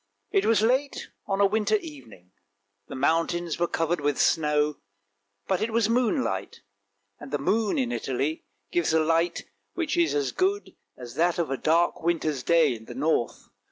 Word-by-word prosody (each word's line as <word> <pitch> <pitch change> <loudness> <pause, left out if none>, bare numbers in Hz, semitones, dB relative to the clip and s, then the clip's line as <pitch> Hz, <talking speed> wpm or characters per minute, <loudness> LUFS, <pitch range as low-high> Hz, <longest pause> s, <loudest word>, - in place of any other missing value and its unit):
It 195 +2 +2
was 220 -2 +3
late 260 +5 0 0.2
on 195 0 -1
a - - +6
winter 215 +1 +1
evening; 125 - -8 0.6
the - - -8
mountains 165 +4 0
were 175 - +2
covered 165 0 -1
with 145 -1 0
snow, 150 -2 +2 0.7
but 190 - 0
it 220 - 0
was 225 -1 +1
moonlight, 250 +2 -1 0.6
and 145 - -10
the 145 - -1
moon 210 - 0
in 255 -3 0
Italy 145 - -2 0.3
gives 175 -2 +1
a - - +5
light 165 +2 +1 0.3
which 335 -2 -1
is 340 - +2
as 140 -3 0
good 395 +2 -1 0.2
as 120 -2 -9
that 170 +1 +1
of 170 -5 -1
a - - +1
dark 165 +5 +1
winter's 160 -4 -1
day 160 -1 +3
in 110 -1 -10
the 120 - -9
north. 145 -3 -1
165 Hz, 170 wpm, -26 LUFS, 145-215 Hz, 0.7 s, a